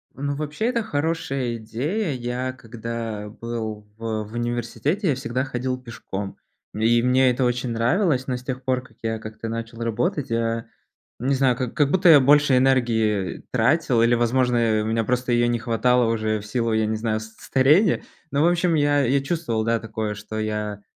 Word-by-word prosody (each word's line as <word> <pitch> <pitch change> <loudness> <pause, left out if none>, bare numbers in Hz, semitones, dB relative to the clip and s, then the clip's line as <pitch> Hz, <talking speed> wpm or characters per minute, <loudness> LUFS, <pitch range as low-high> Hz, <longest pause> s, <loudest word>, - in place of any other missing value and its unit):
Ну, 140 +1 -2
вообще, 150 +8 -3
это 235 -2 +1
хорошая 145 - -2
идея. 145 - -2
Я, 125 +1 -3
когда 115 -3 -6
был 110 -2 -5
в 110 -1 -3
в 105 - -13
университете, 120 - -1
я 135 - +2
всегда 125 0 -2
ходил 130 -1 -3
пешком. 100 -5 -6 0.4
Н 105 - -4
и 115 +1 +4
мне 125 +1 +4
это 125 +2 -1
очень 125 0 0
нравилось, 130 - +1
но 125 - -1
с 125 - -11
тех 130 0 -5
пор, 130 -1 0
как 115 -3 -20
я 115 0 -2
как-то 110 +1 -7
начал 115 0 -5
работать, 140 - -1
я 115 0 -1 0.5
не 135 +2 +1
знаю, 130 -2 +2
как 125 -1 -3
как 145 -2 +2
будто 185 0 +4
я 150 -4 +9
больше 145 0 +5
энергии, 115 -7 +2
э, - - -18
тратил, 125 +1 +2
или, 120 +1 +4
возможно, 120 -2 +2
у - - -3
меня 115 0 0
просто 125 +2 -1
её 120 0 +3
не 120 0 +1
хватало 120 +1 +2
уже 110 -1 0
в 105 - -10
силу, 115 +1 -1
я 110 0 +2
не 110 0 -1
знаю, 110 -1 -1
с 110 - -7
старения, 150 +9 +3 0.3
но, 140 +1 +1
в 165 - +5
общем, 175 0 +2
я 145 -1 +3
я 135 +3 +2
чувствовал, 135 -7 -1
да, 115 0 +2
такое, 110 -1 -4
что 105 +1 -7
я, 105 -1 -3
120 Hz, 190 wpm, -23 LUFS, 115-135 Hz, 0.5 s, я